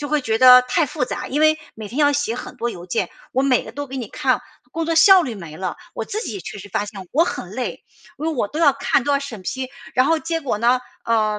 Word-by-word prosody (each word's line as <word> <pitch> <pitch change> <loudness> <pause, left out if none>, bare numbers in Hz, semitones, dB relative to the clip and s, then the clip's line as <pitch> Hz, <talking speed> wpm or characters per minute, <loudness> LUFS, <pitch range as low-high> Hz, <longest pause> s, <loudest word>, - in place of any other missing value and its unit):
就 290 - -4
会 300 0 +1
觉 220 -2 0
得 250 0 +9
太 250 +5 +1
复 255 - -2
杂。 - - -5
因 295 +3 -1
为 310 0 +4 0.2
每 215 -2 -8
天 240 +7 -6
要 290 -1 +4
写 285 -5 -1
很 250 - -8
多 240 0 -2
邮 175 -5 -9
件， 185 - -1 0.2
我 265 - +1
每 265 -3 +2
个 - - -9
都 285 0 -5
给 270 0 -7
你 235 -5 -5
看， 255 +4 0 0.3
工 330 0 -2
作 330 - 0
效 375 +3 +8
率 245 -8 -4
没 165 -6 -9
了， 190 - -3 0.2
我 - - -3
自 430 - -3
己 - - -5
也 390 - -5
确 - - -8
实 205 - -10
发 205 - -1
现 195 -3 -9
我 310 - +4
很 - - -5
累。 - - -5 0.3
因 305 - -5
为 325 - 0
我 240 -8 -1
都 300 - -6
要 295 -4 +6
看、 275 -1 +1
都 290 - +1
要 280 - +3
审 245 -8 -8
批， 260 +7 -4 0.3
然 255 +2 +4
后 325 -1 +3
结 330 +1 -2
果 255 -7 -2
呢， 240 +3 +3 0.2
呃， 215 -2 +1
255 Hz, 300 characters per minute, -21 LUFS, 225-295 Hz, 0.3 s, 得